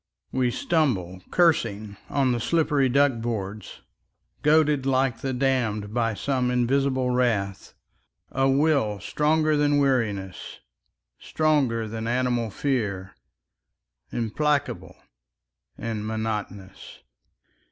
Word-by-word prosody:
We 130 -1 +1
stumble, 120 - 0
cursing, 110 - +1
on 135 -2 +1
the 120 - 0
slippery 145 0 +1
duck 135 -2 +2
boards. 110 -3 -5 0.6
Goaded 150 -3 +3
like 130 -3 +1
the 135 - -3
damned 125 -6 -1
by 115 -2 0
some 125 +4 -1
invisible 130 +1 +1
wrath, 110 -6 -1 0.6
A 135 0 +2
will 135 -7 +2
stronger 155 - +1
than 145 0 +2
weariness, 110 -9 -1 0.6
stronger 135 -8 +1
than 110 +1 -5
animal 120 -1 0
fear, 100 -7 -2 1.0
Implacable 145 +6 -1 0.8
and 110 -2 -4
monotonous. 105 -3 -5
125 Hz, 95 wpm, -25 LUFS, 110-140 Hz, 1.0 s, Goaded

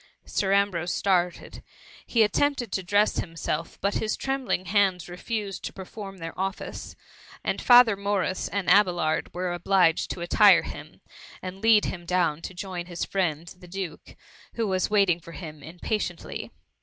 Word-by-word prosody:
T - - -17
Sir 195 -1 0
Ambrose 190 -4 +1
started: 180 -3 0 0.5
he 230 -2 +4
attempted 250 +3 +1
to 190 - -1
dress 205 +4 +2
himself, 165 -1 -4
but 200 +1 +1
his 215 -1 -1
trembling 270 -8 -2
hands 190 -2 +1
refused 195 +2 -4
to - - -5
perform 195 +1 -8
their 165 -2 -6
office, 195 +1 -4 0.5
and - - -1
Father 245 -3 +7
Morris 200 -2 -1
and 200 -2 -3
Abelard 175 -6 +3
were 180 0 -2
obliged 175 -1 +2
to 175 - -5
attire 180 0 +6
him, 150 0 -9 0.4
and 185 +1 -7
lead 220 -2 +5
him 175 -2 -5
down 170 -4 +1
to 185 - -7
join 180 -2 -5
his 175 -2 -3
friend, 170 -4 -1
the 180 - -13
duke, 180 -3 -7 0.4
who 230 - 0
was 185 -2 0
waiting 200 -5 +3
for 170 0 -12
him 155 -4 -9
impatiently. 180 +3 -4
185 Hz, 155 wpm, -26 LUFS, 175-205 Hz, 0.5 s, Father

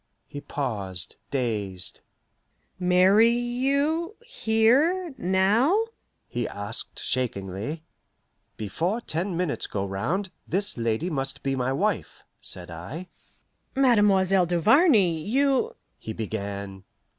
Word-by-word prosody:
He 145 - -8
paused, 100 -10 -3
dazed. 105 -8 -2 0.8
"Marry 185 +5 +5
you 280 - 0
here 295 - +2
now?" 225 - +3 0.4
he 120 -2 -2
asked 100 0 -4
shakingly. 110 - -3 0.7
"Before 165 - -1
ten 175 -3 -3
minutes 175 -5 -1
go 100 -1 -2
round, 150 - -2 0.2
this 200 +3 +2
lady 115 +9 -1
must 135 -1 -3
be 135 -1 0
my 130 0 0
wife," 200 +7 -1 0.2
said 90 -1 -7
I. 130 - -7 0.7
"Mademoiselle 195 -8 +4
Duvarney, 185 - +4
you 270 - +1
" - - -46
he 110 - -6
began. 100 -3 -5
175 Hz, 100 wpm, -26 LUFS, -, 0.8 s, Marry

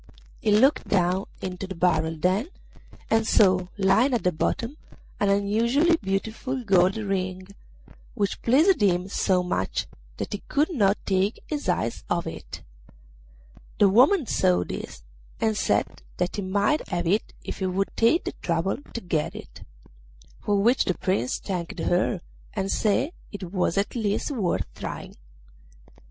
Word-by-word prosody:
He 215 - +1
looked 260 +8 +4
down 185 0 +1 0.2
into 185 0 -4
the 190 - -6
barrel 160 -2 +1
then, 185 - +1 0.6
and 225 0 +3
saw 185 -3 +4
lying 220 +7 +3
at 235 - -2
the 180 - +3
bottom 230 - -2 0.4
an 205 - +2
unusually 230 +11 +3
beautiful 220 +6 -3
gold 190 -1 +3
ring, 185 -2 -3 0.7
which 200 -4 -1
pleased 305 - +4
him 180 -2 +2
so 185 -2 +1
much 95 - -1 0.3
that - - -4
he 205 - -3
could 300 +4 +1
not 205 -7 +3
take 195 +2 0
his 295 -9 -3
eyes 115 -10 -1
off - - 0
it. - - -8 1.1
The 205 - +5
woman 265 - +5
saw 90 - +2
this, - - -7 0.4
and 220 -1 +1
said - - 0 0.2
that 180 0 -1
he 205 - -2
might 205 +10 0
have 175 -2 -2
it 200 +6 0
if - - -6
he 190 - 0
would 195 +2 -1
take 230 +10 +3
the - - -4
trouble 170 +2 0 0.2
to 235 - -3
get 165 -5 -2
it; - - -11 0.8
for 205 -1 0
which 240 +4 +3
the 185 - 0
Prince 185 -10 0
thanked 180 -3 -5
her, 180 +1 0 0.3
and 195 -1 -1
said 225 +8 +1 0.2
it 190 -3 -7
was 180 -1 0
at 200 - 0
least 215 +4 -1
worth 180 - 0
trying. - - -7
195 Hz, 150 wpm, -25 LUFS, 180-225 Hz, 1.1 s, The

